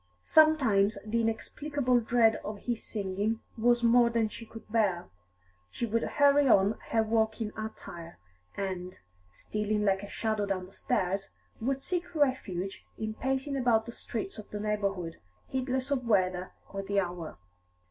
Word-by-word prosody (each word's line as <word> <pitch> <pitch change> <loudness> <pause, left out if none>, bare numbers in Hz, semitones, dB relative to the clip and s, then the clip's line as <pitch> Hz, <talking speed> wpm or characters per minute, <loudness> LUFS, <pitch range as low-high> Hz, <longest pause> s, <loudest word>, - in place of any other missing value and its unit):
Sometimes 250 -10 +4
the 230 +2 +1
inexplicable 250 +3 0
dread 225 -1 +3
of 210 -1 -7
his 240 -2 -2
singing 205 +2 -2 0.2
was 240 +1 +3
more 235 0 +6
than 230 -2 +1
she 230 +2 -9
could 225 - -11
bear; 195 - +1 0.6
she 235 - -3
would 230 0 0
hurry 285 -1 +4
on 205 -2 +4
her 225 -1 +3
walking 220 0 0
attire, 175 -6 -7 0.4
and, 185 -2 -4 0.3
stealing 210 - -2
like 195 -1 +2
a 200 - -8
shadow 215 -2 -1
down 185 -2 -2
the 185 - -15
stairs, 195 +1 -1 0.3
would 270 +3 -1
seek 355 -1 -2
refuge 200 - 0
in 220 0 -3
pacing 265 +4 -1
about 240 -4 +3
the 235 - -6
streets 220 -2 -5
of 210 - -10
the 210 - -5
neighbourhood, 200 -5 -2 0.3
heedless 260 +1 -2
of 250 -4 0
weather 185 -4 +2 0.2
or 195 - -3
the 200 +1 0
hour. 175 -3 -4
220 Hz, 150 wpm, -30 LUFS, 195-245 Hz, 0.6 s, more